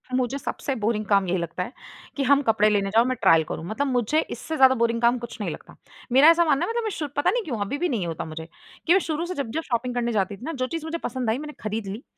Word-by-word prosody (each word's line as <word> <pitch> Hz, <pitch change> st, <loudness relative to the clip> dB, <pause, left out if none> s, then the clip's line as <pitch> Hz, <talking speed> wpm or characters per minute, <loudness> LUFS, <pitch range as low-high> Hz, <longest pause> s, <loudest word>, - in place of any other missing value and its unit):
मुझे 255 Hz, +1 st, 0 dB
सबसे 280 Hz, 0 st, -3 dB
बोरिंग 215 Hz, -1 st, -1 dB
काम 200 Hz, -2 st, +3 dB
यही 180 Hz, +1 st, +1 dB
लगता 170 Hz, +1 st, -3 dB
है 210 Hz, -, -8 dB, 0.5 s
कि 275 Hz, -, +1 dB
हम 280 Hz, +1 st, +4 dB
कपड़े 220 Hz, -4 st, +3 dB
लेने 200 Hz, -2 st, +1 dB
जाओ, 225 Hz, +3 st, +4 dB
मैं 255 Hz, 0 st, 0 dB
ट्रायल 165 Hz, -1 st, +5 dB
करूँ। 160 Hz, -, -5 dB
मतलब 220 Hz, +10 st, -2 dB
मुझे 250 Hz, +3 st, +1 dB
इससे 320 Hz, -, -5 dB
ज़्यादा 265 Hz, -3 st, +6 dB
बोरिंग 230 Hz, -1 st, 0 dB
काम 240 Hz, +1 st, +4 dB
कुछ 235 Hz, 0 st, -8 dB
नहीं -, -, -2 dB
लगता। -, -, -11 dB, 0.4 s
मेरा 270 Hz, +5 st, +7 dB
ऐसा 335 Hz, +1 st, +5 dB
मानना 305 Hz, +1 st, +2 dB
है -, -, -5 dB
मतलब 470 Hz, 0 st, -1 dB
मैं 440 Hz, -, -1 dB
शू 300 Hz, -, -2 dB
पता 290 Hz, -, +2 dB
नहीं 485 Hz, -1 st, 0 dB
क्यों 265 Hz, -, -4 dB
अभी 205 Hz, +8 st, -2 dB
भी 355 Hz, +3 st, 0 dB
नहीं 210 Hz, -9 st, -1 dB
होता 165 Hz, -1 st, -4 dB
मुझे, 160 Hz, 0 st, -7 dB, 0.4 s
कि 340 Hz, -, +6 dB
मैं 385 Hz, -, +5 dB
शुरू 325 Hz, -1 st, -2 dB
से 360 Hz, -, -4 dB
जब-जब 280 Hz, +3 st, -3 dB
शॉपिंग 245 Hz, +1 st, -1 dB
करने 240 Hz, -1 st, 0 dB
जाती 200 Hz, -2 st, -1 dB
थी -, -, -22 dB
ना, 325 Hz, -, -3 dB
जो 255 Hz, -2 st, -2 dB
चीज़ 330 Hz, +1 st, -5 dB
मुझे 320 Hz, +1 st, -3 dB
पसंद 255 Hz, -3 st, -2 dB
आई, 225 Hz, -, +1 dB
मैंने 300 Hz, +1 st, -7 dB
खरीद 215 Hz, -1 st, -3 dB
ली। 205 Hz, +6 st, -6 dB
245 Hz, 280 wpm, -24 LUFS, 210-290 Hz, 0.5 s, मेरा